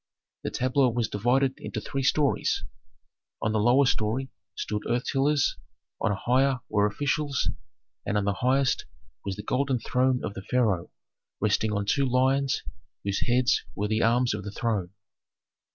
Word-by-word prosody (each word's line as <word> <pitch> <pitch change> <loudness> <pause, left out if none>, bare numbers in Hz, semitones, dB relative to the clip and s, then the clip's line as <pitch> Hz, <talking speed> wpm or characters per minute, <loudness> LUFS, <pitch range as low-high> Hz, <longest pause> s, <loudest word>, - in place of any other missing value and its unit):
The - - -1
tableau 130 +1 +2
was 120 -2 0
divided 130 +6 +1
into - - -4
three 135 - -3
stories; 140 +1 +1 0.8
on 110 - 0
the 110 - +1
lower 125 +6 +5
story 125 +2 0 0.2
stood 105 -1 -3
earth 120 +1 +1
tillers, 140 +1 +2 0.4
on - - +2
a - - 0
higher 130 +4 +2
were 105 0 +3
officials, 140 +4 -1 0.5
and 105 - -1
on 100 - 0
the 100 - +1
highest 130 +5 +1 0.4
was 100 -1 -3
the 105 - -7
golden 130 +3 0
throne 125 +2 +1
of 105 - -4
the 95 - -7
pharaoh 105 -5 0 0.5
resting 105 +1 +1
on 100 -1 -1
two 135 +6 +2
lions 135 +2 +2 0.4
whose 100 -1 -1
heads 125 0 +3
were 105 - -1
the 110 +1 0
arms 120 +1 +3
of 105 -1 -4
the 100 - -5
throne. 105 -4 -1
125 Hz, 160 wpm, -27 LUFS, 105-135 Hz, 0.8 s, lower